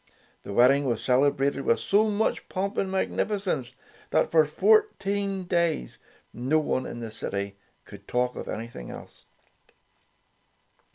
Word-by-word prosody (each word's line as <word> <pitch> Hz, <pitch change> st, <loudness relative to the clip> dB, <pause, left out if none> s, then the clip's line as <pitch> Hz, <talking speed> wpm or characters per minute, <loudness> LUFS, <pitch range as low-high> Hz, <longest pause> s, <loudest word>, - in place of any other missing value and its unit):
The -, -, -8 dB
wedding 130 Hz, +6 st, +4 dB
was 120 Hz, -4 st, -1 dB
celebrated 135 Hz, +1 st, +2 dB
with 115 Hz, -, +2 dB
so 215 Hz, +2 st, +2 dB
much 210 Hz, +1 st, -1 dB
pomp 195 Hz, +1 st, -2 dB
and 190 Hz, -, -1 dB
magnificence 190 Hz, -, -1 dB, 0.4 s
that, -, -, +1 dB
for 160 Hz, -1 st, +5 dB
fourteen 200 Hz, -, +1 dB
days, 170 Hz, -, -1 dB, 0.3 s
no 130 Hz, +6 st, +1 dB
one 140 Hz, -4 st, -1 dB
in 120 Hz, -, -7 dB
the 115 Hz, -1 st, -6 dB
city 100 Hz, -2 st, -4 dB, 0.3 s
could -, -, -13 dB
talk 125 Hz, 0 st, 0 dB
of -, -, -6 dB
anything 110 Hz, -, -6 dB
else. -, -, -11 dB
140 Hz, 130 wpm, -26 LUFS, 120-195 Hz, 0.4 s, for